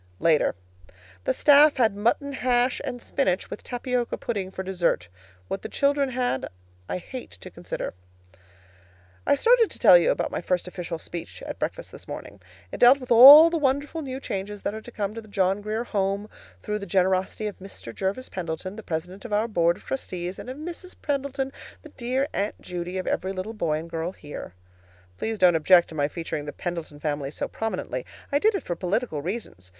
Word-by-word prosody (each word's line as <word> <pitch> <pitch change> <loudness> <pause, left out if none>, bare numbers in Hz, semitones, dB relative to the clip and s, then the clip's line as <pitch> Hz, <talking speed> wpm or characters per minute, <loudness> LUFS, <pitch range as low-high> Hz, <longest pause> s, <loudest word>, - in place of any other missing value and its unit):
LATER. 160 -9 +3 0.7
The - - +2
staff 290 0 +6
had 225 -5 +3
mutton 235 +7 0
hash 250 -1 +1
and 245 - -4
spinach, 190 -10 0
with - - -6
tapioca 245 -1 -2
pudding 200 -5 -3
for 190 0 -6
dessert. 175 - 0 0.4
What 195 - -3
the - - -6
children 280 -1 +1
had 245 - -1 0.4
I - - -1
hate 250 +8 -8
to - - -10
consider. - - -5 1.3
I - - +5
started 460 - +4
to - - -8
tell - - +8
you - - +2
about - - 0
my - - -3
first 180 -1 -1
official 175 -2 -5
speech 170 +1 -8
at - - -6
breakfast - - -4
this - - -11
morning. 100 0 -8 0.3
It - - -6
dealt 250 +3 +7
with 255 -2 -9
all 285 +8 +11
the 335 - 0
wonderful 285 +3 0
new 265 -2 -5
changes 200 -3 -5
that - - -1
are 220 - -6
to 240 - -12
come 205 -2 -3
to 230 - -6
the 215 - -16
John 195 -1 +1
Grier 215 +2 -2
Home 200 -2 -1 0.4
through 210 0 -2
the 200 - -7
generosity 190 +2 +1
of 210 - -5
Mr. 190 -11 -9
Jervis 195 - -2
Pendleton, 185 +2 -5
the - - -6
president 180 +1 -5
of 240 - -8
our 210 +2 +2
board 170 -5 +2
of - - -18
trustees, 180 -8 -4
and - - -8
of 260 - -6
Mrs. 345 +4 -7
Pendleton, 275 -2 -2 0.3
the 310 - -11
dear 260 +1 -1
"Aunt 200 +2 -2
Judy" 180 +1 -5
of 185 - -3
every 190 +1 -1
little 190 +4 -5
boy 160 -8 0
and 160 +2 -6
girl 165 +2 -3
here. 145 - -9 0.6
Please 220 0 -2
don't 180 -3 +6
object 175 +2 +5
to - - -10
my 145 -2 +1
featuring 155 -2 -5
the 145 - -5
Pendleton 170 -4 -5
family 145 -2 -2
so 145 - -4
prominently. 185 - -3 0.3
I 285 - +3
did 435 +5 +3
it 390 - -3
for 175 - -3
political 185 - -1
reasons. 165 - -6
205 Hz, 195 wpm, -25 LUFS, 175-255 Hz, 1.3 s, all